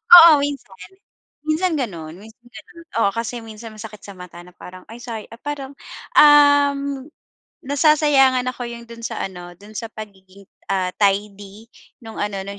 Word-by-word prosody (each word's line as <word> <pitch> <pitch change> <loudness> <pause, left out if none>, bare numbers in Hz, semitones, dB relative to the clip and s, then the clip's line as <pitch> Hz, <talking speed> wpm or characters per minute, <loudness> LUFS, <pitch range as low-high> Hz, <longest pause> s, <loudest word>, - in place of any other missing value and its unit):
Oo, 335 -2 +10
minsan. 280 -9 -5 0.7
Minsan 330 +3 +1
gano'n, 170 - -5
minsan 220 +3 -16
gano'n. 335 +8 -14 0.2
Oo 200 - +3
kasi 230 +1 -4
minsan 220 0 -10
masakit 215 0 -10
sa 200 - -10
mata, 180 -1 -11
na 180 - -17
parang 185 +1 -12
ay 235 - -10
say 225 -3 -7
ah, 230 - -13
parang, 285 -2 -6 0.4
um, 285 -2 +5 0.6
nasasayangan 285 -2 +3
ako 245 -1 -7
'yong 235 0 -9
do'n 230 0 -11
sa 225 - -5
ano, 175 -2 -9
do'n 205 +4 -15
sa 230 - -4
pagiging, 200 -2 -12 0.2
ah, 190 -2 0
tidy 205 +1 -1 0.4
nung 225 0 -10
ano, 205 -2 -3
nung 200 0 -7
225 Hz, 155 wpm, -20 LUFS, 200-280 Hz, 0.7 s, Oo